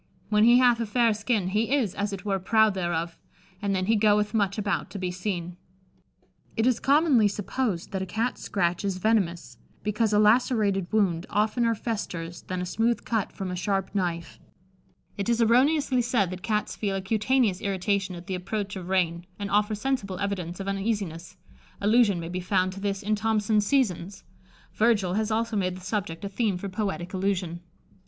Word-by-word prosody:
When 210 0 +4
he 240 +1 +7
hathe 245 -2 +4
a 230 - -2
fayre 230 +1 +3
skinne, 210 -3 -1
he 215 +4 0
is, 235 -10 0
as 205 0 -2
it 195 0 -6
were, 195 -2 0
proude 220 +2 +3
thereof, 170 -2 -2 0.4
and 200 -1 0
then 185 0 0
he 225 +3 +3
goethe 210 0 +3
muche 200 -2 +1
aboute 205 -4 -1
to - - -7
be 185 -2 -2
seene." 180 -2 -4 1.0
It 225 - +2
is 255 -2 +2
commonly 280 -6 +4
supposed 205 -2 -2
that 190 -2 -2
a 190 - -3
Cat's 225 +6 -2
scratch 180 -2 -1
is 195 -2 -1
venomous, 190 -4 0 0.2
because 210 +1 0
a 210 - +3
lacerated 210 -4 +3
wound 190 -5 +1
oftener 230 +2 +1
festers 175 -7 -4
than 185 -1 -4
a - - -2
smooth 225 +6 0
cut 220 -4 -1
from 190 -2 -5
a - - -3
sharp 195 +1 -1
knife. 170 -4 -3 0.8
It 200 +3 -2
is 235 0 +2
erroneously 255 +3 +3
said 230 -6 +1
that 185 0 -6
Cats 210 +1 -1
feel 200 -2 -2
a 195 - -2
cutaneous 215 0 +1
irritation 195 -1 -1
at 170 0 -10
the 190 - -4
approach 200 +2 -3
of 185 -1 -7
rain, 175 -2 0
and 200 -1 -5
offer 210 +1 +2
sensible 210 -5 -2
evidence 185 -3 -3
of 195 - -5
uneasiness: 195 -4 -3 0.4
allusion 210 -2 +3
may 165 0 -5
be 180 +1 -3
found 185 0 0
to 195 - -8
this 200 0 -2
in 215 +2 0
"Thomson's 210 -1 +1
Seasons." 195 -8 0 0.5
Virgil 210 -5 +2
has 215 +2 0
also 225 +1 -1
made 185 -2 -1
the - - -12
subject 185 -1 -3
a - - -1
theme 205 -2 0
for 195 +2 -5
poetic 195 -3 -3
allusion. 185 -3 -1
200 Hz, 185 wpm, -26 LUFS, 185-220 Hz, 1.0 s, he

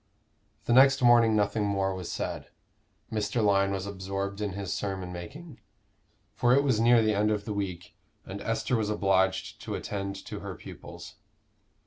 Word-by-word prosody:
The - - +2
next 135 +1 +6
morning 120 -2 +6
nothing 105 +1 +1
more 100 -1 0
was 90 -2 -6
said. - - -4 0.6
Mr. 105 +1 0
Lyon 100 -1 +3
was 95 -1 -3
absorbed 100 +1 -4
in 105 -2 -2
his 100 -1 -4
sermon 95 -3 -4
making, 130 - -9 0.7
for 120 +1 +3
it 140 - +4
was 130 -6 +2
near 115 0 +5
the 110 0 +2
end 105 +1 +2
of 105 -1 -1
the 105 - -3
week, 95 -4 -5 0.3
and 100 +1 -7
Esther 115 +3 -1
was 110 -2 0
obliged 95 -2 +1
to - - -4
attend 100 -1 -4
to - - -6
her - - -7
pupils. - - -11
100 Hz, 165 wpm, -28 LUFS, 95-115 Hz, 0.7 s, next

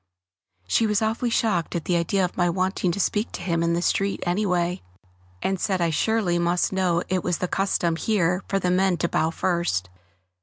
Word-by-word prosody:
She 225 - +2
was 210 0 +1
awfully 225 +3 0
shocked 210 -9 0
at 170 - -3
the 180 - +1
idea 180 +3 +1
of 180 - -6
my 175 -1 +2
wanting 185 0 0
to 175 - -4
speak 210 +3 0
to - - -5
him 170 -2 0
in 170 0 +1
the 170 +1 0
street 195 +2 0
anyway, 180 -1 0 0.6
and 190 -1 0
said 190 -1 0
I 170 -1 +1
surely 180 0 +1
must 175 +2 +1
know 180 -3 +1
it 185 -1 -1
was 175 - 0
the 180 - -2
custom 180 -3 0
here 180 -3 +1
for 195 - 0
the 180 -2 0
men 185 0 +2
to 170 - 0
bow 160 - +1
first. 165 - -1
180 Hz, 200 wpm, -24 LUFS, 170-195 Hz, 0.6 s, She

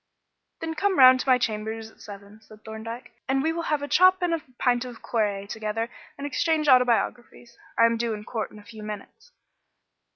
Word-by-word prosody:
"Then 325 0 -3
come 385 +4 0
round 255 -1 +8
to 265 - -2
my 255 - +6
chambers 220 -1 -3
at - - -22
seven," 205 +1 -12
said 215 -1 -18
Thorndyke, 225 +3 -8 0.2
"and 270 0 +1
we 320 +1 +1
will 335 - -3
have 300 -2 0
a - - -3
chop 370 +4 +5
and 350 -1 +1
a 330 - -1 0.2
pint 245 -1 +1
of 245 -2 -10
claret 205 -3 -1
together 220 +2 -3 0.3
and 280 - -6
exchange 310 +1 0
autobiographies. 245 -2 +2 0.2
I 230 - +6
am 230 0 +2
due 230 -1 -1
in 210 - -9
court 220 0 -4
in - - -15
a 210 - -13
few 215 +1 -12
minutes." 210 - -9
235 Hz, 200 wpm, -25 LUFS, 220-285 Hz, 0.3 s, round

